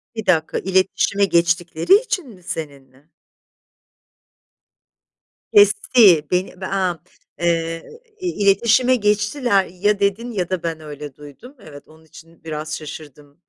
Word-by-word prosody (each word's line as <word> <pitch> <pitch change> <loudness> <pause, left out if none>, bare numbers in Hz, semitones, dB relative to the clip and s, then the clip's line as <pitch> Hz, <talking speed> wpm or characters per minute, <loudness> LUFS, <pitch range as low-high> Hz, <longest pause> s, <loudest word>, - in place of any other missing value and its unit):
1 220 - -5
dakika. 160 -4 +1
İletişime 190 +1 +1
geçtikleri 170 - +2
için 425 - -1
mi 185 -5 -16
seninle? 140 -3 -8 2.4
Kesti. 235 - +5
Beni, 180 +1 -2
be - - -4
aaa, 185 -4 -1 0.4
ııı, 165 -1 -1 0.4
i 365 - -4
iletişime 230 - +3
geçtiler, 210 0 +1
ya 200 +4 -1
dedin 205 +5 -1
ya 185 -5 -3
da 185 -2 -3
ben 165 -1 -3
öyle 150 -2 -9
duydum. 150 - -14
Evet, 145 -7 -14
onun 160 +1 -20
için 165 +1 -18
biraz 155 -1 -5
şaşırdım 150 0 -12
180 Hz, 120 wpm, -20 LUFS, 160-210 Hz, 2.4 s, Kesti